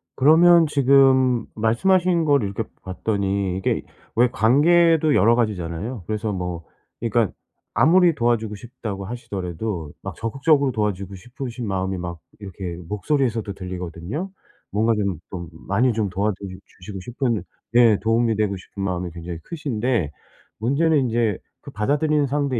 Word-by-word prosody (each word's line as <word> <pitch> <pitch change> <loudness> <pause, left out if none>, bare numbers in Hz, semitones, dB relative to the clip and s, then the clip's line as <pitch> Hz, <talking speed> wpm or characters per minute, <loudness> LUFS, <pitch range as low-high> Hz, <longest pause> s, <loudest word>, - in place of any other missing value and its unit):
그러면 165 +4 +6
지금 130 -3 +4
말씀하신 175 - +2
걸 140 -6 +3
이렇게 100 +3 -2 0.2
봤더니 100 -1 -1
이게 95 - -1 0.3
왜 120 +2 +4
관계도 155 +5 +4
여러 115 +5 +5
가지잖아요. 105 0 -2
그래서 110 0 -2
뭐 90 -3 -4 0.3
그러니까 115 -2 +1 0.4
아무리 175 +1 +5
도와주고 115 -4 0
싶다고 105 -4 -7
하시더라도 95 -6 -5
막 - - -5
적극적으로 135 +4 +2
도와주고 100 -3 -2
싶으신 120 +3 -7
마음이 95 -1 -2
막 85 -1 -5 0.2
이렇게 95 -4 -7
목소리에서도 115 - -1
들리거든요. 90 - -5 0.4
뭔가 110 +3 +2
좀 100 -6 -1
좀 85 -3 -6 0.2
많이 115 +5 +2
좀 105 -2 -1
도와드리 100 -1 -3
주시고 95 +1 -10
싶은 115 -1 -2 0.3
예 115 -4 +6
도움이 115 0 +2
되고 105 -2 0
싶은 95 +1 -8
마음이 90 -2 -2
굉장히 85 0 -7
크신데 125 - -2 0.5
문제는 145 +7 +2
인제 115 -5 0 0.2
그 - - -10
받아들이는 145 +6 +1
상대 140 -2 0
110 Hz, 345 characters per minute, -22 LUFS, 95-130 Hz, 0.5 s, 그러면